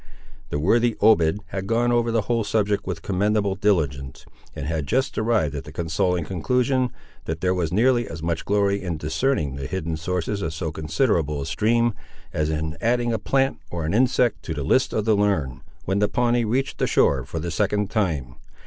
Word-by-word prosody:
The -, -, -2 dB
worthy 115 Hz, +9 st, +2 dB
Obed 105 Hz, -3 st, +4 dB
had 95 Hz, 0 st, -4 dB
gone 120 Hz, +2 st, +2 dB
over 120 Hz, -1 st, +2 dB
the 115 Hz, -2 st, +1 dB
whole 115 Hz, +1 st, 0 dB
subject, 105 Hz, -1 st, 0 dB
with 85 Hz, -3 st, -4 dB
commendable 100 Hz, +1 st, +1 dB
diligence, 75 Hz, -10 st, -1 dB, 0.3 s
and 70 Hz, -, -5 dB
had 75 Hz, -2 st, -2 dB
just 130 Hz, -, 0 dB
arrived 110 Hz, -10 st, +1 dB
at 70 Hz, -2 st, -5 dB
the 75 Hz, -, -11 dB
consoling 85 Hz, +1 st, 0 dB
conclusion, 125 Hz, -, +1 dB, 0.4 s
that 80 Hz, 0 st, -4 dB
there 90 Hz, 0 st, +2 dB
was 85 Hz, -4 st, -1 dB
nearly 120 Hz, +4 st, +3 dB
as 80 Hz, -, -7 dB
much 85 Hz, -1 st, -1 dB
glory 100 Hz, -1 st, +1 dB
in 85 Hz, -4 st, -3 dB
discerning 80 Hz, -, -1 dB
the 70 Hz, -, -5 dB
hidden 85 Hz, -1 st, -3 dB
sources 90 Hz, +5 st, -2 dB
of 80 Hz, -3 st, -3 dB
so 80 Hz, -1 st, -3 dB
considerable 80 Hz, -, 0 dB
a -, -, -5 dB
stream, 115 Hz, +5 st, +1 dB, 0.4 s
as 75 Hz, 0 st, 0 dB
in 80 Hz, +1 st, -2 dB
adding 120 Hz, 0 st, +1 dB
a 110 Hz, -, -1 dB
plant, 135 Hz, 0 st, +1 dB
or 85 Hz, -2 st, -3 dB
an 80 Hz, -, -1 dB
insect, 125 Hz, 0 st, +2 dB
to -, -, -5 dB
the -, -, -3 dB
lists -, -, +2 dB
of 110 Hz, -, -1 dB
the 110 Hz, -1 st, +4 dB
learned, 80 Hz, -11 st, 0 dB, 0.3 s
when 95 Hz, +2 st, 0 dB
the 105 Hz, -, +2 dB
Pawnee 120 Hz, -1 st, +1 dB
reached 125 Hz, +5 st, -1 dB
the -, -, +1 dB
shore 65 Hz, -2 st, +3 dB
for 75 Hz, +6 st, -7 dB
the 85 Hz, +2 st, -3 dB
second 105 Hz, +4 st, 0 dB
time. 75 Hz, -, -1 dB
95 Hz, 195 wpm, -23 LUFS, 80-115 Hz, 0.4 s, Obed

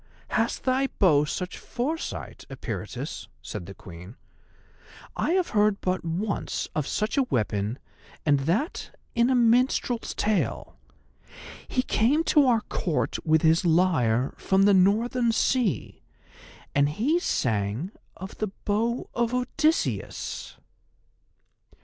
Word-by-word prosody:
"Has 225 Hz, +1 st, 0 dB
thy 265 Hz, +1 st, +1 dB
bow 150 Hz, -7 st, +4 dB
such 180 Hz, +4 st, -4 dB
foresight, 305 Hz, +7 st, -4 dB
Eperitus?" -, -, -6 dB, 0.2 s
said 100 Hz, -6 st, -6 dB
the 95 Hz, -, -9 dB
Queen. 90 Hz, +5 st, -11 dB, 1.0 s
"I -, -, 0 dB
have 370 Hz, -2 st, +1 dB
heard 210 Hz, -2 st, +2 dB
but 185 Hz, 0 st, -1 dB
once 185 Hz, +6 st, -2 dB
of 150 Hz, -3 st, -1 dB
such 215 Hz, +6 st, -1 dB
a -, -, +5 dB
weapon, 105 Hz, 0 st, -1 dB, 0.5 s
and 145 Hz, -2 st, +4 dB
that 255 Hz, -, -2 dB, 0.2 s
in 235 Hz, +1 st, +3 dB
a 260 Hz, -, +3 dB
minstrel's 245 Hz, 0 st, +2 dB
tale. 210 Hz, -3 st, -1 dB, 0.9 s
He 255 Hz, -, 0 dB
came 270 Hz, +10 st, +2 dB
to 295 Hz, -3 st, +6 dB
our 235 Hz, -3 st, +3 dB
Court 170 Hz, -6 st, -2 dB
with 160 Hz, 0 st, +3 dB
his 160 Hz, +2 st, +4 dB
lyre 160 Hz, -9 st, +2 dB
from 190 Hz, 0 st, +2 dB
the 200 Hz, 0 st, +6 dB
Northern 230 Hz, +6 st, +3 dB
Sea, 225 Hz, -, 0 dB, 0.7 s
and 140 Hz, 0 st, +3 dB
he 255 Hz, -, +1 dB
sang 115 Hz, -, -1 dB, 0.3 s
of 190 Hz, +2 st, -8 dB
the 215 Hz, -, 0 dB, 0.2 s
Bow 225 Hz, +4 st, 0 dB
of 235 Hz, +1 st, 0 dB
Odysseus." 305 Hz, +6 st, -1 dB
205 Hz, 120 wpm, -26 LUFS, 150-245 Hz, 1.0 s, to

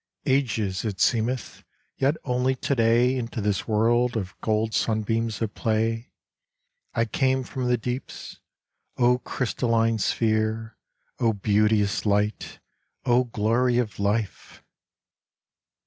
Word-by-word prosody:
Ages 115 Hz, -9 st, 0 dB
it 105 Hz, -4 st, -4 dB
seemeth, 120 Hz, +4 st, 0 dB, 0.3 s
Yet 140 Hz, +4 st, +1 dB
only 125 Hz, 0 st, +1 dB
to 135 Hz, -, -1 dB
day 120 Hz, +2 st, +3 dB
Into 120 Hz, -2 st, -4 dB
this 105 Hz, -2 st, -1 dB
world 120 Hz, +2 st, +2 dB
of 95 Hz, -4 st, -4 dB
Gold 110 Hz, 0 st, 0 dB
sunbeams 110 Hz, -1 st, 0 dB
at 105 Hz, -, -3 dB
play, 115 Hz, +1 st, -1 dB, 0.8 s
I 115 Hz, -, +2 dB
came 130 Hz, +3 st, +1 dB
from 125 Hz, 0 st, -4 dB
the 125 Hz, 0 st, +2 dB
deeps. 125 Hz, +3 st, -6 dB, 0.6 s
O 125 Hz, 0 st, +3 dB
crystalline 115 Hz, -3 st, 0 dB
sphere! 110 Hz, +1 st, 0 dB, 0.4 s
O 115 Hz, -2 st, +2 dB
beauteous 105 Hz, 0 st, +1 dB
light! 105 Hz, +1 st, 0 dB, 0.5 s
O 125 Hz, +1 st, +3 dB
glory 120 Hz, +2 st, +1 dB
of 110 Hz, -5 st, -2 dB
life! 105 Hz, +1 st, -2 dB
115 Hz, 115 wpm, -25 LUFS, 110-125 Hz, 0.8 s, day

